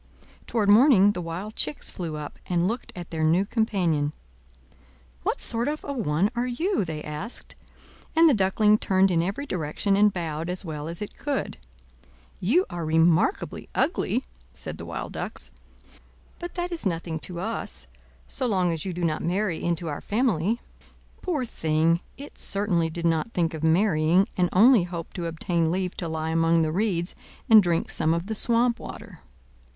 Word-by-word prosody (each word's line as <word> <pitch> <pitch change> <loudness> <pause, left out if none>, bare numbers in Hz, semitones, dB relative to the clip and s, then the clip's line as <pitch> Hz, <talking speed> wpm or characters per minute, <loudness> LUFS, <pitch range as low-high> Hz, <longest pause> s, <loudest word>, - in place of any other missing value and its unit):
Toward 220 -4 0
morning 205 -2 +7
the 180 - -4
wild 180 +6 -5
chicks 150 -1 -2
flew 165 -4 -5
up, 150 -1 -7
and 175 0 +1
looked 230 +5 -3
at 175 -1 -8
their 160 -1 -3
new 165 +5 +3
companion. 180 -10 0 1.1
"What - - -1
sort 235 +2 +1
of 305 +1 -2
a 285 - -4
one 200 - +1
are 240 +1 0
you?" 335 - 0
they 155 -3 -5
asked; 150 +10 -6 0.6
and 330 +1 +7
the 300 - +6
Duckling 210 +1 +3
turned 190 0 +3
in 165 -2 +3
every 200 +11 -2
direction, 180 - 0
and 205 +1 +5
bowed 165 -2 -3
as 180 +2 -4
well 150 -2 -5
as 170 +5 -4
it 210 - -9
could. 285 -2 -3 0.8
You 315 - +3
are 170 -1 -4
remarkably 165 - +2
ugly!" 250 - +1 0.3
said - - -7
the - - -6
Wild - - -5
Ducks. - - -5 0.9
"But 345 0 -7
that 355 0 -2
is 340 - -3
nothing 165 -4 -2
to 175 +2 -6
us, 225 +5 -4 0.4
so 260 - -1
long 185 -5 +2
as 160 - -4
you 185 - -3
do 175 +1 -4
not 155 -2 0
marry 180 0 -1
into 170 0 -1
our 145 - -4
family." 220 -1 0 0.6
Poor 310 -9 -1
thing! 160 -4 +1 0.2
it 285 +1 -11
certainly 190 -5 0
did 170 +1 -5
not 165 +7 +1
think 165 -2 0
of 160 -1 -6
marrying, 170 +1 +3
and 180 -2 +2
only 230 +3 +6
hoped 170 -2 -7
to 170 -1 -2
obtain 165 0 0
leave 180 +1 -1
to 170 - -3
lie 160 0 -2
among 165 0 +3
the 155 - 0
reeds 180 -2 0 0.3
and 220 -1 +9
drink 170 -3 0
some 160 +1 +1
of 170 +1 -3
the 220 - -3
swamp 235 +2 +1
water. - - -9
180 Hz, 175 wpm, -26 LUFS, 165-220 Hz, 1.1 s, and